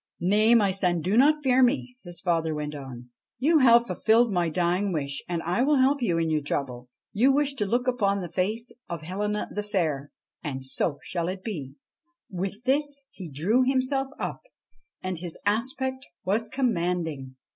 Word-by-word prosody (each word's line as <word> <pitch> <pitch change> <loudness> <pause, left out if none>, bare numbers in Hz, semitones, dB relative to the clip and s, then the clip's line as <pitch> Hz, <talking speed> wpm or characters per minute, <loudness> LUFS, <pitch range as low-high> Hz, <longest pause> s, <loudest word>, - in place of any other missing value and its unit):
' - - -54
Nay, 210 +6 +4
my 205 -4 +4
son, 180 -2 +2
do 185 +6 0
not 295 +4 +4
fear 260 -1 +4
me,' 250 0 +2
his 175 -2 -4
father 165 -3 0
went 150 0 -4
on. 125 -4 -9
' - - -67
You 310 +6 +4
have 240 -2 +6
fulfilled 230 -1 +2
my 175 -2 +1
dying 180 +4 0
wish, 140 -4 -3
and 170 -2 -2
I 180 +7 0
will 290 +3 +3
help 270 +1 +3
you 175 -8 +1
in 165 -1 +1
your 155 -1 +1
trouble. 125 -4 -4 0.2
You 245 +7 +4
wish 285 0 +1
to 215 -7 -2
look 245 +4 0
upon 200 -6 +1
the 180 - -4
face 215 +7 -1 0.2
of 170 -2 -5
Helena 210 +5 -2
the 210 - -2
Fair, 165 -9 -1 0.3
and 135 -3 -4
so 140 +4 0
it - - -24
shall 175 +1 -2
be.' 145 - -5 0.6
With 195 +4 -4
this 280 +2 +1
he 185 -4 -9
drew 185 - +2
himself 265 +1 +1
up, - - -4 0.6
and 185 -2 -3
his 170 -1 -4
aspect 260 +5 -1 0.2
was 215 +4 +2
commanding. 170 - -1
195 Hz, 185 wpm, -26 LUFS, 165-250 Hz, 0.6 s, have